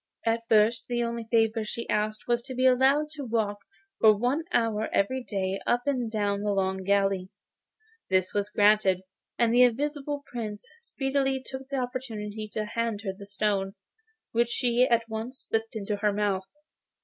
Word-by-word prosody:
At 230 Hz, 0 st, +2 dB
first 220 Hz, +2 st, +4 dB
the 240 Hz, -1 st, 0 dB
only 235 Hz, -1 st, -3 dB
favour 225 Hz, -1 st, +2 dB
she 235 Hz, +2 st, -5 dB
asked 215 Hz, +1 st, -1 dB
was 240 Hz, 0 st, +2 dB
to 260 Hz, -, -6 dB
be 255 Hz, +1 st, +1 dB
allowed 270 Hz, +4 st, +4 dB
to 300 Hz, -2 st, -7 dB
walk 220 Hz, -4 st, -1 dB, 0.4 s
for 215 Hz, -2 st, +6 dB
one 255 Hz, +8 st, 0 dB
hour 220 Hz, -4 st, +1 dB
every 255 Hz, +6 st, +1 dB
day 195 Hz, -3 st, -2 dB
up 245 Hz, 0 st, +2 dB
and 255 Hz, -5 st, 0 dB
down 205 Hz, -2 st, 0 dB
the 205 Hz, 0 st, 0 dB
long 190 Hz, -1 st, 0 dB
gallery. 195 Hz, -1 st, +1 dB, 0.8 s
This 185 Hz, -1 st, +1 dB
was 205 Hz, 0 st, 0 dB
granted, 205 Hz, -3 st, +4 dB, 0.4 s
and 235 Hz, -1 st, +3 dB
the 245 Hz, -, +6 dB
Invisible 285 Hz, +3 st, +1 dB
Prince 215 Hz, -4 st, -6 dB
speedily 270 Hz, -, -1 dB
took 265 Hz, 0 st, -7 dB
the 275 Hz, -, -2 dB
opportunity 220 Hz, -4 st, -4 dB
of 215 Hz, -1 st, -2 dB
handing 225 Hz, -2 st, -2 dB
her 190 Hz, -, -2 dB
the 200 Hz, 0 st, -11 dB
stone, 200 Hz, -1 st, -1 dB, 0.6 s
which 235 Hz, +1 st, +2 dB
she 245 Hz, +1 st, +2 dB
at 230 Hz, -1 st, +2 dB
once 230 Hz, +4 st, -6 dB
slipped 225 Hz, +1 st, -2 dB
into 210 Hz, -1 st, -2 dB
her 210 Hz, 0 st, +1 dB
mouth. 200 Hz, -2 st, -1 dB
225 Hz, 170 wpm, -27 LUFS, 205-250 Hz, 0.8 s, for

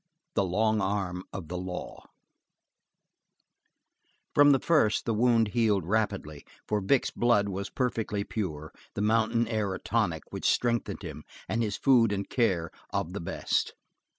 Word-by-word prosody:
The -, -, +2 dB
Long 110 Hz, +4 st, +1 dB
Arm 95 Hz, -2 st, -2 dB
Of 90 Hz, -5 st, -6 dB
The 90 Hz, +2 st, -4 dB
Law 90 Hz, 0 st, -7 dB, 2.3 s
From 145 Hz, 0 st, +7 dB
the 135 Hz, -, +5 dB
first 145 Hz, -11 st, +2 dB
the 115 Hz, -, 0 dB
wound 115 Hz, -1 st, +3 dB
healed 105 Hz, -5 st, +1 dB
rapidly, 100 Hz, -7 st, -1 dB, 0.2 s
for 105 Hz, -1 st, 0 dB
Vic's 120 Hz, +7 st, +2 dB
blood 110 Hz, -4 st, +2 dB
was 100 Hz, +1 st, -4 dB
perfectly 115 Hz, -5 st, -1 dB
pure, 80 Hz, -9 st, -4 dB, 0.2 s
the 100 Hz, -, -1 dB
mountain 115 Hz, +1 st, +2 dB
air 105 Hz, -4 st, -1 dB
a -, -, -7 dB
tonic -, -, 0 dB
which -, -, 0 dB
strengthened 120 Hz, -1 st, 0 dB
him, -, -, -7 dB, 0.2 s
and 115 Hz, -, -1 dB
his 105 Hz, -3 st, -1 dB
food 120 Hz, -5 st, +4 dB
and 100 Hz, -1 st, -2 dB
care 90 Hz, -10 st, 0 dB, 0.2 s
of 85 Hz, -, -2 dB
the 100 Hz, -, -4 dB
best. 85 Hz, -, -1 dB
105 Hz, 150 wpm, -28 LUFS, 95-115 Hz, 2.3 s, From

